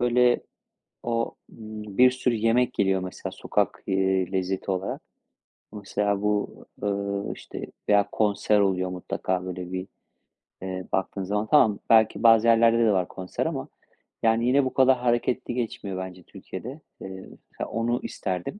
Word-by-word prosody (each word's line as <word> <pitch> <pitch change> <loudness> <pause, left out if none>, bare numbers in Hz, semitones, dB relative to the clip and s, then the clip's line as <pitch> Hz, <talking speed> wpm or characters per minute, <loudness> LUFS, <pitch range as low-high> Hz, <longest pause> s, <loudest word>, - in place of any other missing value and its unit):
böyle, 125 0 +3 0.6
o 115 -1 -1
bir 110 +2 +1
sürü 125 -2 0
yemek 115 +3 +2
geliyor, 95 -1 +1
mesela, 95 - -6
sokak, - - -1
eee, 95 -1 +1
lezzeti 95 +1 -1
olarak. 95 0 -3 0.7
O, 105 - -8
mesela, 100 0 -1
bu, 105 0 -1 0.2
ııı, 100 0 -2
işte, - - -8 0.2
veya 100 -1 +4
konser 105 0 +2
oluyor 95 -2 +1
mutlaka 90 0 -3
böyle 90 0 -6
bir, 95 0 -4 0.7
eee, 95 -1 -5
baktığın 95 +1 -1
zaman. 105 +3 -1
Tamam, 110 -9 +5
belki 110 +1 +4
bazı 115 0 +6
yerlerde 115 0 +5
de 115 -2 +4
var 90 -3 +1
konser. 95 -1 -4
Ama, - - -3 0.6
yani, 115 +1 +3
yine 140 +2 +4
bu 130 - -2
kadar 130 -1 +5
hareketli 120 0 0
geçmiyor 110 -5 -3
bence 95 -1 -7
Türkiye'de. 135 +6 -9 0.2
Eee, 95 - -6 0.4
mesela, - - -5
onu 120 +2 0
isterdim. 95 - -4
105 Hz, 145 wpm, -26 LUFS, 95-115 Hz, 0.7 s, bazı